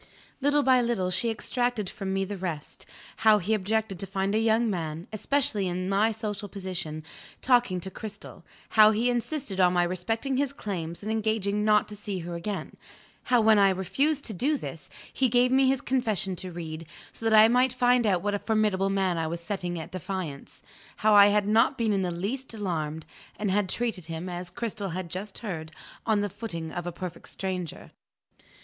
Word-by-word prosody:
Little 290 Hz, +1 st, +3 dB
by 255 Hz, -2 st, +5 dB
little, 230 Hz, -7 st, 0 dB
she 185 Hz, +6 st, +1 dB
extracted 240 Hz, -1 st, -1 dB
from 190 Hz, +1 st, -5 dB
me 195 Hz, 0 st, 0 dB
the 205 Hz, +1 st, -5 dB
rest: 175 Hz, -6 st, -6 dB, 0.3 s
how 220 Hz, -1 st, +6 dB
he 205 Hz, +3 st, -1 dB
objected 215 Hz, -1 st, -1 dB
to 195 Hz, -, -3 dB
find 195 Hz, +1 st, -1 dB
a 215 Hz, -, +3 dB
young 225 Hz, +1 st, +3 dB
man, 165 Hz, -4 st, -3 dB
especially 215 Hz, -3 st, 0 dB
in 180 Hz, +1 st, -2 dB
my 205 Hz, +3 st, +3 dB
social 210 Hz, -2 st, -4 dB
position, 180 Hz, -6 st, -5 dB, 0.4 s
talking 245 Hz, -8 st, +3 dB
to 190 Hz, -, -6 dB
Cristel; 210 Hz, -1 st, -9 dB, 0.3 s
how 215 Hz, -1 st, +7 dB
he 225 Hz, +3 st, +2 dB
insisted 240 Hz, -4 st, -2 dB
on 180 Hz, -1 st, +5 dB
my 175 Hz, -1 st, +3 dB
respecting 225 Hz, +9 st, -1 dB
his 280 Hz, 0 st, 0 dB
claims, 175 Hz, -7 st, -5 dB
and 215 Hz, -, -2 dB
engaging 215 Hz, -2 st, 0 dB
not 210 Hz, 0 st, +4 dB
to 210 Hz, -, -8 dB
see 205 Hz, -1 st, -5 dB
her 170 Hz, +1 st, -6 dB
again; 190 Hz, +4 st, -5 dB, 0.5 s
how, 245 Hz, -1 st, +4 dB
when 220 Hz, -1 st, +6 dB
I 200 Hz, -1 st, +6 dB
refused 275 Hz, -, 0 dB
to 220 Hz, -, -2 dB
do 275 Hz, +10 st, +1 dB
this, -, -, -8 dB, 0.2 s
he 260 Hz, -2 st, +2 dB
gave 245 Hz, +2 st, +3 dB
me 265 Hz, 0 st, +5 dB
his 265 Hz, -1 st, +2 dB
confession 215 Hz, -8 st, 0 dB
to 185 Hz, +1 st, -6 dB
read, 165 Hz, -1 st, -6 dB, 0.2 s
so -, -, -11 dB
that 220 Hz, -, +6 dB
I 215 Hz, -, +9 dB
might 250 Hz, +2 st, +3 dB
find 245 Hz, -2 st, +3 dB
out 185 Hz, -3 st, +2 dB
what 205 Hz, 0 st, 0 dB
a 205 Hz, -, 0 dB
formidable 210 Hz, -3 st, +1 dB
man 190 Hz, -3 st, +1 dB
I 160 Hz, -, -1 dB
was 170 Hz, +1 st, -3 dB
setting 175 Hz, -2 st, -4 dB
at 160 Hz, -, -8 dB
defiance; 185 Hz, -5 st, -6 dB, 0.4 s
how 215 Hz, -, +6 dB
I 200 Hz, -1 st, +9 dB
had 205 Hz, 0 st, +2 dB
not 225 Hz, +6 st, +4 dB
been 225 Hz, -3 st, +1 dB
in 195 Hz, -, +1 dB
the 180 Hz, -, 0 dB
least 225 Hz, +9 st, -4 dB
alarmed, 160 Hz, -6 st, -3 dB, 0.3 s
and 210 Hz, -2 st, -1 dB
had 200 Hz, -1 st, +1 dB
treated 225 Hz, -8 st, -2 dB
him 165 Hz, +2 st, -5 dB
(as 175 Hz, 0 st, -5 dB
Cristel 210 Hz, -1 st, -4 dB
had 185 Hz, -1 st, -4 dB
just 190 Hz, +3 st, -6 dB
heard) 160 Hz, -5 st, -5 dB, 0.4 s
on 215 Hz, -2 st, +3 dB
the 205 Hz, -, 0 dB
footing 170 Hz, -8 st, -6 dB
of 175 Hz, 0 st, -4 dB
a -, -, -2 dB
perfect 180 Hz, 0 st, -7 dB
stranger. 185 Hz, -4 st, -5 dB
205 Hz, 195 wpm, -27 LUFS, 180-225 Hz, 0.5 s, I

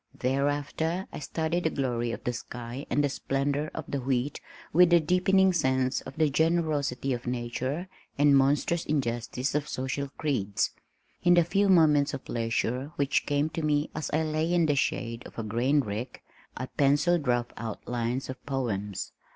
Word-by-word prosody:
Thereafter 145 Hz, +6 st, -1 dB
I -, -, -5 dB
studied 160 Hz, +3 st, -2 dB
the -, -, +4 dB
glory 120 Hz, -5 st, -1 dB
of -, -, -6 dB
the 125 Hz, -, -1 dB
sky 120 Hz, +2 st, -7 dB
and 145 Hz, -, +2 dB
the -, -, +3 dB
splendor 140 Hz, +2 st, -1 dB
of 160 Hz, -, -5 dB
the 140 Hz, -, -2 dB
wheat 130 Hz, +2 st, -1 dB, 0.3 s
with 175 Hz, +2 st, +6 dB
a 170 Hz, -, +8 dB
deepening 185 Hz, +3 st, +3 dB
sense 130 Hz, -4 st, +1 dB
of 135 Hz, -, -10 dB
the 155 Hz, -1 st, +3 dB
generosity 150 Hz, -4 st, +1 dB
of 120 Hz, 0 st, -5 dB
nature 125 Hz, +7 st, -2 dB, 0.3 s
and 145 Hz, 0 st, +5 dB
monstrous 145 Hz, +5 st, +2 dB
injustice 125 Hz, -2 st, -1 dB
of 150 Hz, 0 st, -1 dB
social 135 Hz, +2 st, -3 dB
creeds. 110 Hz, -10 st, 0 dB, 0.5 s
In 175 Hz, 0 st, +5 dB
the 175 Hz, -, +6 dB
few 195 Hz, +4 st, +2 dB
moments 150 Hz, -5 st, +5 dB
of 130 Hz, -, -9 dB
leisure 120 Hz, +4 st, -1 dB
which 140 Hz, -4 st, +1 dB
came 145 Hz, +1 st, +1 dB
to 165 Hz, -, -4 dB
me 150 Hz, -1 st, +1 dB
as 155 Hz, -, -3 dB
I 155 Hz, +2 st, +2 dB
lay 155 Hz, +2 st, 0 dB
in 175 Hz, -2 st, +3 dB
the 145 Hz, -2 st, +2 dB
shade 115 Hz, -3 st, -1 dB
of -, -, -16 dB
a 115 Hz, -, -2 dB
grain 120 Hz, +7 st, +2 dB
rick, 115 Hz, +2 st, -5 dB, 0.3 s
I 130 Hz, -, -3 dB
pencilled 145 Hz, +4 st, +2 dB
rough 120 Hz, -1 st, +1 dB
outlines 120 Hz, +3 st, -3 dB
of 130 Hz, -1 st, -8 dB
poems. 105 Hz, -8 st, -2 dB
140 Hz, 170 wpm, -28 LUFS, 125-155 Hz, 0.5 s, a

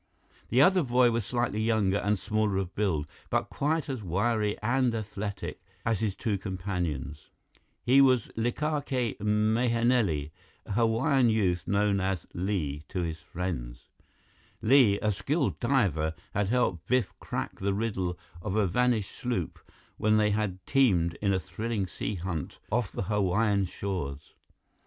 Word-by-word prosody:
The 125 Hz, +4 st, +5 dB
other 185 Hz, +3 st, +5 dB
boy 125 Hz, -3 st, +4 dB
was 115 Hz, -3 st, -1 dB
slightly 120 Hz, -3 st, -1 dB
younger 110 Hz, -3 st, +2 dB
and 105 Hz, +1 st, +1 dB
smaller 105 Hz, 0 st, 0 dB
of 95 Hz, -1 st, -2 dB
build, 95 Hz, -8 st, 0 dB, 0.2 s
but -, -, 0 dB
quite 155 Hz, 0 st, 0 dB
as 130 Hz, -4 st, -3 dB
wiry 105 Hz, +3 st, 0 dB
and 120 Hz, +1 st, +1 dB
athletic 105 Hz, -2 st, -5 dB, 0.2 s
as 115 Hz, -2 st, +1 dB
his 105 Hz, -3 st, -1 dB
two 105 Hz, -5 st, -1 dB
companions. 90 Hz, -, -4 dB, 0.5 s
He 130 Hz, +3 st, +6 dB
was 130 Hz, -5 st, +4 dB
Likake 130 Hz, 0 st, -1 dB
Mahenili, 110 Hz, -, +2 dB, 0.3 s
a -, -, -8 dB
Hawaiian 115 Hz, +4 st, +3 dB
youth 95 Hz, -6 st, +1 dB
known 100 Hz, 0 st, +2 dB
as 95 Hz, -2 st, -1 dB
"Li" 85 Hz, -6 st, -2 dB
to 90 Hz, -, -2 dB
his 80 Hz, -2 st, -3 dB
friends. 65 Hz, -10 st, -5 dB, 0.7 s
Li, 115 Hz, -4 st, +6 dB
a 105 Hz, -, +3 dB
skilled 135 Hz, -, -1 dB
diver, 95 Hz, -, +1 dB, 0.2 s
had 105 Hz, -1 st, +1 dB
helped 95 Hz, -9 st, 0 dB
Biff 125 Hz, -6 st, +1 dB
crack -, -, -4 dB
the 100 Hz, 0 st, 0 dB
riddle 95 Hz, -5 st, -2 dB, 0.2 s
of 95 Hz, +1 st, -3 dB
a 110 Hz, -2 st, +3 dB
vanished 115 Hz, +1 st, +1 dB
sloop 120 Hz, -10 st, -3 dB, 0.4 s
when 110 Hz, 0 st, +3 dB
they 105 Hz, -1 st, +3 dB
had 100 Hz, -4 st, -2 dB
teamed 95 Hz, -12 st, +3 dB
in 100 Hz, -1 st, +2 dB
a 95 Hz, -, +2 dB
thrilling 100 Hz, +3 st, -3 dB
sea 95 Hz, +3 st, -4 dB
hunt 85 Hz, -4 st, -4 dB
off 115 Hz, -1 st, 0 dB
the -, -, -3 dB
Hawaiian 100 Hz, 0 st, +1 dB
shores. 85 Hz, -7 st, -5 dB
105 Hz, 145 wpm, -28 LUFS, 95-120 Hz, 0.7 s, He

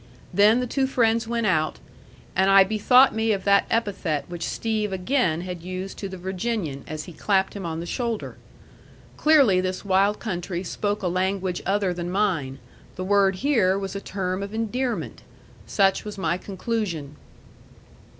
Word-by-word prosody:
Then 210 Hz, +6 st, +5 dB
the -, -, -1 dB
two 265 Hz, +2 st, 0 dB
friends 230 Hz, -3 st, +1 dB
went 235 Hz, -1 st, -1 dB
out, 155 Hz, -6 st, +1 dB, 0.6 s
and 190 Hz, +1 st, +3 dB
I 195 Hz, 0 st, +8 dB
bethought 220 Hz, +6 st, +5 dB
me 220 Hz, 0 st, +1 dB
of 195 Hz, -2 st, -3 dB
that 200 Hz, 0 st, +4 dB
epithet 195 Hz, -9 st, -1 dB
which 175 Hz, -1 st, -6 dB
Steve 215 Hz, -2 st, -2 dB
again 185 Hz, -, 0 dB
had 180 Hz, -1 st, -6 dB
used 185 Hz, +2 st, -6 dB
to 195 Hz, -, -4 dB
the 190 Hz, -, -7 dB
Virginian 185 Hz, -, -3 dB
as 155 Hz, 0 st, -5 dB
he 175 Hz, -, -10 dB
clapped 190 Hz, +4 st, +1 dB
him 195 Hz, -4 st, -5 dB
on 160 Hz, 0 st, -4 dB
the 170 Hz, -, -5 dB
shoulder. 235 Hz, +2 st, -3 dB, 0.8 s
Clearly 275 Hz, -12 st, +5 dB
this 185 Hz, +1 st, -3 dB
wild 200 Hz, +2 st, +3 dB
country 180 Hz, -3 st, -4 dB
spoke 205 Hz, +3 st, -2 dB
a -, -, +1 dB
language 185 Hz, 0 st, -1 dB
other 195 Hz, -2 st, +1 dB
than 175 Hz, 0 st, -4 dB
mine 180 Hz, -9 st, 0 dB, 0.4 s
the 185 Hz, -, -4 dB
word 195 Hz, 0 st, +3 dB
here 205 Hz, -10 st, +3 dB
was 195 Hz, 0 st, -5 dB
a 200 Hz, -, -4 dB
term 185 Hz, -1 st, -3 dB
of 200 Hz, +2 st, -5 dB
endearment. 240 Hz, +3 st, -2 dB, 0.5 s
Such 195 Hz, -2 st, +2 dB
was 210 Hz, -1 st, -7 dB
my 170 Hz, -3 st, 0 dB
conclusion. 185 Hz, -6 st, -4 dB
195 Hz, 165 wpm, -24 LUFS, 180-220 Hz, 0.8 s, I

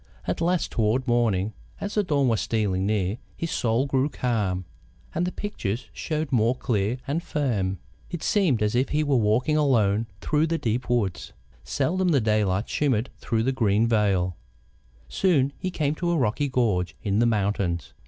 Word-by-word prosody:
At -, -, -2 dB
last, 175 Hz, 0 st, +1 dB
toward 115 Hz, +4 st, +1 dB
morning, 110 Hz, -4 st, +1 dB, 0.3 s
as 200 Hz, -, -4 dB
the 210 Hz, -, +3 dB
dawn 145 Hz, -8 st, +1 dB
was 115 Hz, -3 st, +2 dB
stealing 100 Hz, -4 st, 0 dB
near, 105 Hz, +1 st, 0 dB, 0.2 s
his 165 Hz, -, -3 dB
soul 120 Hz, +3 st, +1 dB
grew 135 Hz, +1 st, +1 dB
calm, 105 Hz, -9 st, -1 dB, 0.5 s
and 175 Hz, +2 st, 0 dB
the -, -, -2 dB
pictures 120 Hz, -, -4 dB
showed 155 Hz, -1 st, -3 dB
more 120 Hz, 0 st, +3 dB
clear 115 Hz, -2 st, 0 dB
and 150 Hz, +5 st, -1 dB
firm. 105 Hz, -, -1 dB, 0.3 s
It 175 Hz, -, -5 dB
seemed 165 Hz, -, +2 dB
as 105 Hz, -, +1 dB
if 125 Hz, +3 st, +1 dB
he 150 Hz, +1 st, +1 dB
were 145 Hz, -2 st, +1 dB
walking 120 Hz, +7 st, +2 dB
alone 115 Hz, -7 st, +2 dB
through 150 Hz, -, +1 dB
the 165 Hz, 0 st, 0 dB
deep 120 Hz, -1 st, -2 dB
woods. 105 Hz, -8 st, -1 dB, 0.3 s
Seldom 180 Hz, +7 st, 0 dB
the 145 Hz, -5 st, +4 dB
daylight 105 Hz, -3 st, +1 dB
shimmered 130 Hz, -5 st, 0 dB
through 115 Hz, -1 st, 0 dB
the 130 Hz, -, +1 dB
green 110 Hz, -4 st, +2 dB
veil. 100 Hz, -6 st, +1 dB, 0.7 s
Soon 140 Hz, -8 st, +2 dB
he 185 Hz, -, -2 dB
came 150 Hz, -5 st, 0 dB
to 175 Hz, +2 st, -2 dB
a 170 Hz, -, +2 dB
rocky 130 Hz, +3 st, +1 dB
gorge 105 Hz, -9 st, 0 dB
in 100 Hz, 0 st, +1 dB
the 120 Hz, -, +4 dB
mountains. 100 Hz, -5 st, -1 dB
120 Hz, 175 wpm, -25 LUFS, 105-145 Hz, 0.7 s, the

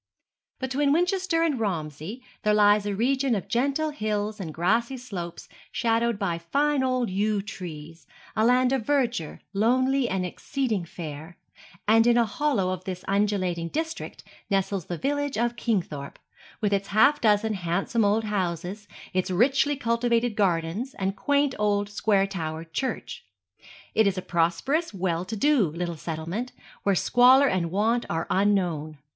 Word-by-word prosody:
Between 275 Hz, +2 st, 0 dB
Winchester 355 Hz, +1 st, +1 dB
and 300 Hz, -7 st, +1 dB
Romsey 170 Hz, -, -4 dB, 0.2 s
there 210 Hz, 0 st, +2 dB
lies 205 Hz, 0 st, +4 dB
a 205 Hz, -, -1 dB
region 260 Hz, +3 st, +1 dB
of 195 Hz, -, -4 dB
gentle 280 Hz, +6 st, 0 dB
hills 215 Hz, -4 st, -2 dB
and 170 Hz, -5 st, -5 dB
grassy 225 Hz, -, 0 dB
slopes 185 Hz, -9 st, -7 dB, 0.2 s
shadowed 230 Hz, -1 st, +1 dB
by 175 Hz, -5 st, -1 dB
fine 285 Hz, +11 st, +1 dB
old 255 Hz, -4 st, 0 dB
yew 205 Hz, +2 st, +1 dB
trees, 165 Hz, -6 st, -9 dB, 0.3 s
a 220 Hz, -, +2 dB
land 250 Hz, +2 st, +4 dB
of 265 Hz, -4 st, 0 dB
verdure, 240 Hz, -, -1 dB
lonely 255 Hz, +5 st, +2 dB
and 190 Hz, -1 st, -1 dB
exceeding 220 Hz, 0 st, -2 dB
fair; 160 Hz, 0 st, -8 dB, 0.5 s
and 225 Hz, +2 st, +5 dB
in 240 Hz, 0 st, +5 dB
a 235 Hz, -, +4 dB
hollow 220 Hz, -5 st, 0 dB
of 185 Hz, 0 st, -4 dB
this 185 Hz, -1 st, -6 dB
undulating 195 Hz, -4 st, 0 dB
district 320 Hz, -, -4 dB, 0.3 s
nestles 195 Hz, -2 st, 0 dB
the 175 Hz, -, -4 dB
village 285 Hz, -, -1 dB
of 240 Hz, +1 st, 0 dB
Kingthorpe, 170 Hz, -, -2 dB, 0.4 s
with 205 Hz, -2 st, +1 dB
its 195 Hz, 0 st, 0 dB
half 220 Hz, +8 st, +4 dB
dozen 215 Hz, 0 st, +3 dB
handsome 195 Hz, +5 st, 0 dB
old 210 Hz, +2 st, +2 dB
houses, 195 Hz, 0 st, -3 dB, 0.3 s
its 185 Hz, +1 st, 0 dB
richly 270 Hz, -, +3 dB
cultivated 235 Hz, -2 st, 0 dB
gardens, 190 Hz, +5 st, 0 dB
and 195 Hz, 0 st, -2 dB
quaint 285 Hz, +1 st, +1 dB
old 205 Hz, -1 st, +1 dB
square 205 Hz, -1 st, +2 dB
towered 165 Hz, -4 st, -5 dB
church. 265 Hz, -, -3 dB, 0.7 s
It 220 Hz, -2 st, +4 dB
is 195 Hz, -1 st, 0 dB
a 185 Hz, -, -3 dB
prosperous, 175 Hz, -, 0 dB
well 180 Hz, -2 st, -1 dB
to 220 Hz, -, -5 dB
do 275 Hz, -, +3 dB
little 170 Hz, +2 st, -4 dB
settlement, 165 Hz, +10 st, -4 dB, 0.3 s
where 200 Hz, -1 st, +2 dB
squalor 250 Hz, +8 st, +6 dB
and 180 Hz, -7 st, 0 dB
want 220 Hz, +6 st, +1 dB
are 165 Hz, 0 st, -1 dB
unknown. 175 Hz, -6 st, +1 dB
210 Hz, 150 wpm, -26 LUFS, 180-250 Hz, 0.7 s, squalor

